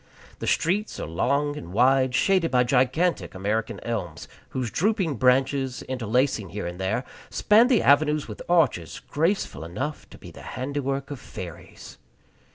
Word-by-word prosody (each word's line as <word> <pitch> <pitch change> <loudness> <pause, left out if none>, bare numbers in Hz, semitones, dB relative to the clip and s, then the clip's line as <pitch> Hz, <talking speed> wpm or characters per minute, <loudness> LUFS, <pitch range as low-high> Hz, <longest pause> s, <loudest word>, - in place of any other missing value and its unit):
The - - -4
streets 200 +6 0
are - - -3
long 140 - 0
and 85 - -8
wide, 130 +2 +3
shaded 185 - +3
by 125 -1 +3
gigantic 130 - +1
American 105 +4 -2
elms, 105 -9 -4 0.2
whose 125 -4 -3
drooping 190 - 0
branches, 130 +1 +2
interlacing 125 -4 0
here 100 +3 -5
and 85 +1 -6
there, 100 +6 -1 0.3
span 220 +3 +4
the 250 -4 +3
avenues 150 +1 +3
with 105 - -8
arches 145 - +2
graceful 165 - -1
enough 130 - -5
to - - -13
be - - -12
the - - -12 0.2
handiwork 135 +1 -3
of 140 - -5
fairies. 85 -6 -10
130 Hz, 150 wpm, -25 LUFS, 110-150 Hz, 0.3 s, span